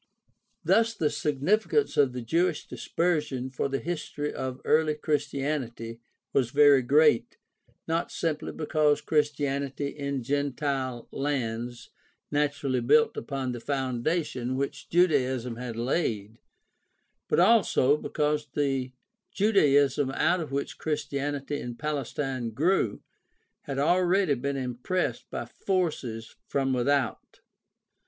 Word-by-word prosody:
Thus 225 0 +3
the 155 -7 0
significance 200 - +1
of 140 -3 +4
the 125 -1 -5
Jewish 165 +6 +1
Dispersion 150 -7 -1
for 135 +1 -2
the 135 - 0
history 150 -2 -4
of 130 0 -4
early 155 -1 +3
Christianity 140 -6 -2 0.3
was 125 -4 +2
very 145 0 +6
great, 145 0 +3 0.5
not 165 +1 -1
simply 155 -2 -2
because 150 -2 +1
Chris 150 -1 +1
tianity 140 0 -2
in 140 -3 -3
gentile 135 -2 -2
lands 120 -4 -3 0.4
naturally 145 -3 0
built 220 - +4
upon 135 -3 -3
the 120 - -5
foundation 130 0 -1
which 140 +1 -4
Judaism 130 -9 +2
had 120 -2 -5
laid, 115 -4 -2 0.9
but - - +2
also 180 - +4
because 150 0 -1
the 135 -3 0 0.4
Judaism 145 - +3
out 175 +6 +2
of 155 -4 -5
which 140 +1 -3
Christianity 145 -1 -2
in 120 -1 -6
Palestine 135 -3 -3
grew 145 - +1 0.6
had 135 -1 -4
already 180 +3 +3
been 140 +2 -2
impressed 130 +8 -2
by - - -4
forces 150 - -2
from 135 -1 0
without. 130 0 -1
140 Hz, 115 wpm, -27 LUFS, 130-155 Hz, 0.9 s, very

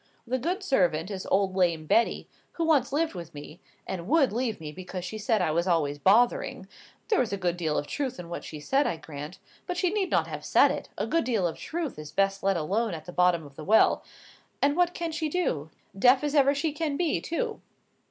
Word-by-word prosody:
The 255 +2 -1
only 380 +3 -2
servant 185 - +1
is 190 -2 -5
old 195 -1 +1
lame 170 -4 +1
Betty, 230 +9 +2 0.3
who 335 - -1
once 290 -6 +3
lived 315 +3 0
with 170 -4 -8
me, 150 +3 -10 0.3
and 175 -2 -5
would 280 -4 +3
leave 235 -1 -1
me 155 -2 -6
because 180 +2 -7
she 215 +3 -5
said 215 -2 +1
I 160 - +1
was 170 +3 0
always 150 -5 +1
bothering—(there 220 - +1
was 235 - 0
a 200 - -1
good 175 -2 0
deal 160 -4 -1
of 145 - -1
truth 260 - -3
in 175 - -7
what 170 - -6
she 155 - -8
said, 270 - +1
I 165 - -2
grant, 150 +2 -8 0.3
but 360 -1 -3
she 365 -1 +1
need 395 -3 0
not - - +2
have - - -7
said - - +5
it; - - -5
a - - -1
good 330 0 +1
deal 225 -7 +1
of 170 - -1
truth 320 - -4
is 150 -1 -8
best 195 +1 +1
let 195 -1 +2
alone 200 +5 -1
at 155 -1 -9
the 180 - -9
bottom 180 -3 +3
of 140 -1 -14
the 155 - -8
well), 215 +7 +4 0.6
and 285 +1 +2
what 355 0 +2
can 335 -1 -3
she 315 -1 -2
do,—deaf 245 - +1
as 295 -1 -1
ever 280 -1 +4
she 300 +1 -1
can 300 -2 -2
be, 345 -4 0
too?" 440 +7 -3
200 Hz, 225 wpm, -27 LUFS, -, 0.6 s, said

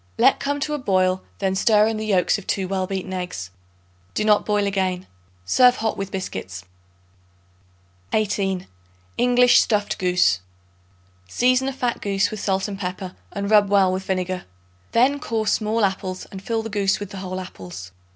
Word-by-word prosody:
Let - - +4
come 285 +1 -1
to 300 - -1
a 295 - -2
boil; 185 -5 +1 0.2
then 190 -1 0
stir 210 +2 +4
in 220 0 -1
the 215 - -3
yolks 195 0 +2
of 200 - -14
2 190 -2 -1
well 190 -1 -1
beaten 190 -1 -4
eggs. 180 - -5 0.6
Do 215 - +1
not 210 -1 +3
boil 210 -1 +2
again. 190 -2 -1 0.4
Serve 250 - +5
hot 220 -2 -1
with 195 0 -4
biscuits. 95 - -6 1.5
18. 195 -3 0 0.5
English 245 0 +5
Stuffed 210 -2 0
Goose. 180 - +3 0.9
Season 255 - +2
a - - 0
fat 250 -3 -2
goose 195 -1 0
with 215 - -5
salt 195 0 0
and 200 -2 -6
pepper, 185 0 -5 0.2
and 200 +1 -3
rub 205 -2 +5
well 195 -2 +4
with 185 - -2
vinegar. 185 -1 -2 0.5
Then 270 +5 +3
core 225 -6 -2
small 215 +1 +1
apples 190 -1 -3
and 190 - -8
fill 225 +1 -2
the 225 - -5
goose 200 -1 +1
with 205 -1 -7
the 195 - -7
whole 185 -1 -5
apples. 90 - -9
195 Hz, 170 wpm, -22 LUFS, 185-215 Hz, 1.5 s, Serve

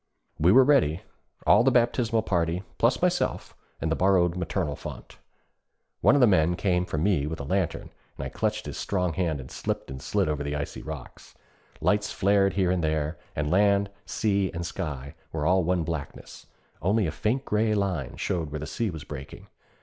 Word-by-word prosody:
We 85 +4 +5
were 130 +5 +8
ready, 90 - +3 0.4
all - - +6
the 135 - +5
baptismal 120 -2 +2
party, 85 -2 0 0.2
plus - - +3
myself - - 0 0.2
and 80 - -1
the - - +2
borrowed 90 -2 +3
'maternal 85 -3 -2
font.' - - -9 0.8
One 135 - +5
of 140 - +4
the - - +8
men 90 -5 +3
came 90 -1 0
for - - -3
me 80 -3 +1
with 80 +1 -4
a - - -4
lantern, 95 +4 -2 0.3
and 70 - -4
I - - -4
clutched 110 +7 -2
his - - -6
strong 90 -3 -1
hand 80 -3 -1
and 65 - -9
slipped - - -4
and 65 0 -7
slid - - 0
over 75 -1 -1
the 75 0 -3
icy 70 -1 -4
rocks. - - -9 0.5
Lights 105 0 +1
flared 100 0 +3
here 95 -3 +2
and 90 -2 0
there, 75 0 -1 0.2
and 75 0 -1
land, 100 +1 +3 0.2
sea, 100 -3 +1
and 85 +1 -3
sky 75 -6 -5 0.2
were 75 -2 -2
all 90 +2 +3
one 90 0 +1
blackness; 80 -3 -6 0.3
only 100 +3 +2
a 80 - -1
faint 120 - -1
gray 105 +1 +1
line 95 -9 -2
showed 85 -5 -2
where 75 +1 -5
the 75 - -5
sea 105 +8 -2
was 80 -4 -7
breaking. 70 -3 -9
90 Hz, 190 wpm, -26 LUFS, 75-100 Hz, 0.8 s, were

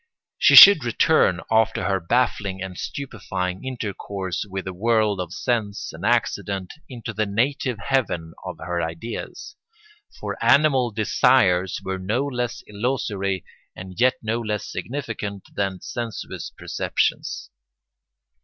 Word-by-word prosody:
She - - +6
should 200 -8 +11
return, 120 - +3
after 110 0 +2
her 95 -2 +1
baffling 100 -1 0
and 95 -1 -6
stupefying 95 -8 -4
intercourse 100 -6 -4
with 95 0 -5
the 95 - -5
world 110 0 +1
of 90 -2 -6
sense 105 -1 -2
and - - -10
accident, 95 -2 0 0.2
into 115 -3 -7
the 110 0 -1
native 125 +4 0
heaven 100 -9 -1
of 90 -3 -6
her 85 +1 -3
ideas. 80 +8 -6 0.6
For - - -5
animal 140 -4 +4
desires 95 -4 +2
were 95 0 -3
no 110 +9 -1
less 125 -4 -3
illusory, 100 -4 -2 0.3
and 95 0 -9
yet 130 +1 +4
no 110 +2 -1
less 105 -2 -3
significant, 110 -7 -5
than 95 -2 -2
sensuous 115 -4 -5
perceptions. 70 - -2
105 Hz, 125 wpm, -23 LUFS, 95-120 Hz, 0.6 s, should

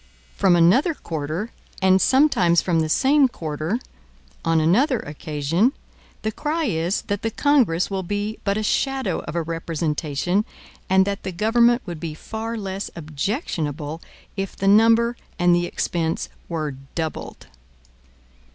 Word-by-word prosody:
From 190 -3 +4
another 205 - +4
quarter, 160 - -4 0.3
and 190 0 +4
sometimes 260 - +4
from 170 -1 +1
the 160 -1 0
same 275 - +4
quarter, 160 - -3 0.7
on 165 -1 +2
another 230 - +3
occasion, 155 - 0 0.5
the 220 - 0
cry 315 +8 -2
is 170 - -1
that 205 0 -3
the 225 - -1
Congress 230 - +2
will 195 -1 -1
be 205 +4 -3
but 200 0 0
a 215 - -1
shadow 265 -4 0
of - - -5
a 170 - 0
representation, 165 +2 -1 0.5
and 190 0 +5
that 200 0 -3
the 190 - -4
government 235 +6 +3
would 170 -3 -6
be 160 -2 -5
far 225 +6 -5
less 195 -1 -4
objectionable 155 - -3 0.3
if 195 -1 -4
the 195 - -2
number 230 +3 +5 0.2
and 175 -1 +4
the 175 0 +2
expense 165 -2 -2 0.2
were 155 -3 -2 0.2
doubled. 160 -2 -4
190 Hz, 140 wpm, -23 LUFS, 165-225 Hz, 0.7 s, and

